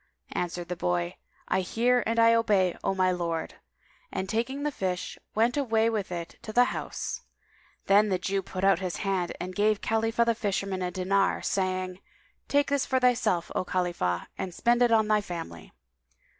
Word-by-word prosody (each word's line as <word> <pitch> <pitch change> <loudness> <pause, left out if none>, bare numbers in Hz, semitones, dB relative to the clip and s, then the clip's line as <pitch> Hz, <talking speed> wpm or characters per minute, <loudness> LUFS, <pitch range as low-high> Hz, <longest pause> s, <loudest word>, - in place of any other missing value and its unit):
Answered 175 0 -3
the 180 - -3
boy, 90 - -1 0.3
"I 190 - +1
hear 240 +6 +2
and 230 +1 0
I 230 0 +6
obey, 205 -6 +3
O 195 - 0
my 185 -1 +3
lord" 170 -2 -3 0.5
and, 190 - -3
taking 240 +7 -2
the 295 - 0
fish, 185 -7 -3 0.2
went 230 +5 +2
away 230 -4 +2
with 205 -5 -2
it 170 -1 -6
to 215 - -7
the 245 +3 +5
house. - - -4 0.6
Then 205 +2 +5
the 185 - +2
Jew 195 +2 -1
put 185 0 -6
out 195 -2 +4
his 185 -2 -3
hand 190 -3 0
and 185 +1 -5
gave 210 +1 +2
Khalifah 225 +1 +1
the 230 - +3
fisherman 195 -3 -2
a 180 - -1
dinar, 195 +2 +1
saying, 185 -1 -1 0.5
"Take 285 0 +2
this 280 -2 +2
for 260 -1 +2
thyself, 245 -9 +2
O - - 0
Khalifah, 175 - -1
and 180 -2 -4
spend 240 +1 +2
it 240 -1 +5
on 220 -1 +4
thy 210 -1 +3
family." 165 - -7
195 Hz, 180 wpm, -28 LUFS, 180-230 Hz, 0.6 s, I